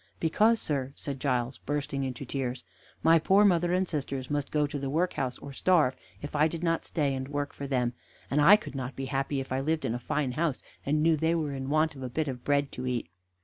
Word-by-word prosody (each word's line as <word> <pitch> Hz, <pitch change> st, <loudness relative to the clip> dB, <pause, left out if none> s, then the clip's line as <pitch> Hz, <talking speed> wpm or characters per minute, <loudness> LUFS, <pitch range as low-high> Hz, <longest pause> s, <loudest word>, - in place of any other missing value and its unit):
"Because, 215 Hz, +8 st, +3 dB
sir," 140 Hz, -3 st, -2 dB
said 140 Hz, -2 st, -5 dB
Giles, 125 Hz, -2 st, -1 dB
bursting 145 Hz, -1 st, -2 dB
into 130 Hz, 0 st, -4 dB
tears, 130 Hz, -1 st, -3 dB, 0.4 s
"my 165 Hz, 0 st, +6 dB
poor 195 Hz, +6 st, +5 dB
mother 175 Hz, -3 st, +3 dB
and 185 Hz, +1 st, +2 dB
sisters 135 Hz, -4 st, -3 dB
must 145 Hz, -1 st, -1 dB
go 150 Hz, -1 st, +2 dB
to 145 Hz, 0 st, -4 dB
the 135 Hz, 0 st, -3 dB
workhouse 140 Hz, -5 st, 0 dB
or 140 Hz, -, -9 dB
starve 150 Hz, -4 st, +3 dB, 0.3 s
if 145 Hz, -, -6 dB
I 150 Hz, +1 st, +4 dB
did 165 Hz, +1 st, -5 dB
not 165 Hz, -1 st, +1 dB
stay 145 Hz, -4 st, 0 dB
and 130 Hz, 0 st, -3 dB
work 145 Hz, 0 st, -3 dB
for 140 Hz, -, -6 dB
them, 125 Hz, -3 st, 0 dB, 0.4 s
and 145 Hz, +2 st, +3 dB
I 190 Hz, +8 st, +9 dB
could 210 Hz, -, -5 dB
not 130 Hz, -1 st, -4 dB
be 135 Hz, -, -4 dB
happy 135 Hz, +1 st, -1 dB
if 135 Hz, -, -6 dB
I 130 Hz, -, +1 dB
lived 155 Hz, +3 st, 0 dB
in 110 Hz, -, 0 dB
a 120 Hz, -, -3 dB
fine 135 Hz, +2 st, -1 dB
house, 155 Hz, +1 st, 0 dB, 0.3 s
and 150 Hz, +2 st, +2 dB
knew 165 Hz, 0 st, +5 dB
they 160 Hz, +3 st, +2 dB
were 155 Hz, -4 st, -1 dB
in 135 Hz, 0 st, -4 dB
want 155 Hz, +1 st, +2 dB
of 135 Hz, -, -11 dB
a 130 Hz, -, -4 dB
bit 155 Hz, +5 st, -1 dB
of 125 Hz, -3 st, -5 dB
bread 140 Hz, -1 st, +1 dB
to 125 Hz, 0 st, -5 dB
eat." 120 Hz, -9 st, -2 dB
145 Hz, 240 wpm, -29 LUFS, 130-160 Hz, 0.4 s, I